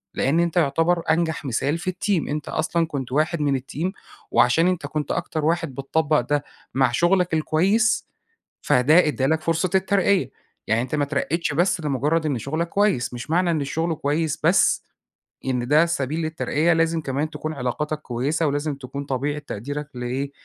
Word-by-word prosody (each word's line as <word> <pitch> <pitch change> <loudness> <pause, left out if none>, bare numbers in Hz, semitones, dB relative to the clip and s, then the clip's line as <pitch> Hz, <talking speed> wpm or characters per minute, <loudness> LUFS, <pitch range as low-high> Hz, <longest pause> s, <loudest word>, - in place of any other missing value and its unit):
لأن 145 +6 +2
أنت 170 0 0
يُعتبر 165 +2 +2
أنجح 160 -2 0
مثال 140 +5 0
في 180 +2 -2
الteam 185 -1 -1
أنت 150 0 -3
أصلًا 165 +1 0
كُنت 135 -5 -5
واحد 155 +3 +1
من 140 -2 +1
الteam 155 +7 -4 0.4
وعشان 160 +8 +4
أنت 180 -5 -1
كُنت 150 +1 -3
أكتر 160 -3 -2
واحد 165 -4 0
بتطبق 150 +3 +1
ده 145 +4 -1 0.3
مع 130 -2 +3
شُغلك 175 +6 +2
الكويس، 185 +8 +2 0.5
فده 155 +8 +4
ادّى 140 -3 0
لَك 160 +3 +1
فُرصة 165 +3 0
الترقية، 195 0 +2 0.4
يعني 110 +1 +2
أنت 130 +4 -3
ما 145 - +1
اترقيتش 150 +3 -1
بس 175 +3 +1
لمُجرد 150 +3 0
إن 140 -5 0
شُغلك 155 +8 -2
كويس، 200 -14 +1
مش 120 +2 -7
معنى 175 +2 +2
إن 155 -3 0
الشغل 160 +4 -1
كويس 150 +1 -1
بس، 170 +5 +3 0.6
إن 125 -2 -1
ده 150 +4 +5
سبيل 155 -2 -2
للترقية. 160 +1 +1
لازم 165 0 +1
كمان 145 +2 -2
تكون 155 0 -5
علاقاتك 150 +3 -2
كويسة، 140 +6 -1
ولازم 145 +1 -1
تكون 135 +1 -7
طبيعة 140 +2 -2
تقديرك 145 +2 -6
لإيه 125 +3 -3
155 Hz, 165 wpm, -23 LUFS, 140-170 Hz, 0.6 s, ده